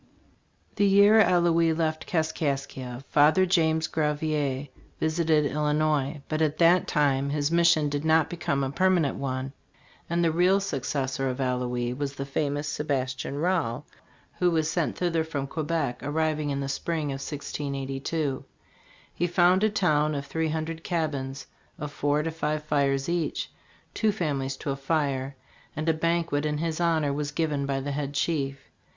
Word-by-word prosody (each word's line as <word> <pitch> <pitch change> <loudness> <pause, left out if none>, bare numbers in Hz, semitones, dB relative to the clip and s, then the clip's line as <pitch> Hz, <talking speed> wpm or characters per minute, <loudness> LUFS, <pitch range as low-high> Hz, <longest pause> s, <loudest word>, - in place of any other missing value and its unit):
The 205 - +4
year 200 +3 +6
Allouez 170 -4 +3
left 155 -1 -1
Kaskaskia, 140 -6 -2
Father 155 +6 +5
James 160 -3 +2
Gravier 150 -3 -1 0.3
visited 160 -1 +2
Illinois, 150 -1 0
but 155 0 -2
at 155 -1 +1
that 175 +1 +4
time 140 -2 +1
his 145 +1 0
mission 170 -3 +4
did 145 0 -2
not 160 -1 +4
become 140 -5 -1
a 135 - -2
permanent 175 -2 +2
one; 130 0 -3 0.6
and 170 +1 +1
the 165 - +3
real 180 +4 +3
successor 135 -6 -2
of 125 +1 -4
Allouez 125 -2 -1
was 140 0 -3
the 135 - -4
famous 145 +1 -2
Sebastian 135 -2 -2
Rale, 150 -5 0 0.5
who 180 - +4
was 160 -2 +1
sent 170 -4 -1
thither 170 -2 +1
from 145 -4 -3
Quebec, 155 -3 -2
arriving 155 0 -1
in 140 0 -1
the 140 - -3
spring 150 +1 -2
of 135 0 -5
1682. 140 0 -3 0.7
He 175 - 0
found 180 +2 +4
a 215 - +4
town 155 -7 +1
of 140 0 -4
three 160 +1 -1
hundred 160 +1 -3
cabins, 140 -6 -2 0.3
of 150 -1 -5
four 145 +1 0
to 165 - -2
five 155 -1 -2
fires 140 -2 +1
each, 170 -2 -2 0.4
two 220 -1 +2
families 140 -8 -2
to 140 - -3
a - - -1
fire; 135 -2 -1 0.4
and 155 +2 -3
a 160 - +4
banquet 165 -2 0
in 150 -1 -1
his 160 +1 -2
hon 165 -3 +2
or 140 - 0
was 145 0 -2
given 145 -2 -1
by 135 -1 0
the 140 +2 -4
head 140 0 -3
chief. 140 -3 -1
150 Hz, 160 wpm, -27 LUFS, 140-165 Hz, 0.7 s, year